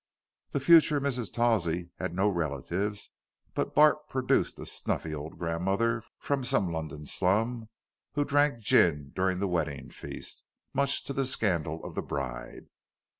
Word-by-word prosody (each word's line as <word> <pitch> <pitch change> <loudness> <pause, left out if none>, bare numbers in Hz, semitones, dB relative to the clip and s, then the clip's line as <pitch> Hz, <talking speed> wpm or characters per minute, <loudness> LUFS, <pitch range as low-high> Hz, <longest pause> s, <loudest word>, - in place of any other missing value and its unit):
The - - -1
future 155 0 +6
Mrs. 130 -6 -2
Tawsey 90 -8 +1
had 85 - -3
no 95 +3 +3
relatives, 90 +4 -2 0.4
but - - -2
Bart 150 0 +5
produced 130 -1 +1
a - - -7
snuffy 80 - -2
old 75 +1 -6
grandmother 95 +7 0 0.2
from 140 -2 -1
some 95 -7 +2
London 75 -2 -5
slum 110 +8 0 0.4
who 145 -1 +1
drank 145 -5 +2
gin 75 -8 +3
during 95 0 +1
the 100 +2 0
wedding 75 -7 -2
feast, - - -8 0.3
much 140 0 +1
to 140 - -5
the 135 - 0
scandal 85 - 0
of - - -7
the - - -2
bride. 65 -4 -5
95 Hz, 145 wpm, -29 LUFS, 80-125 Hz, 0.4 s, future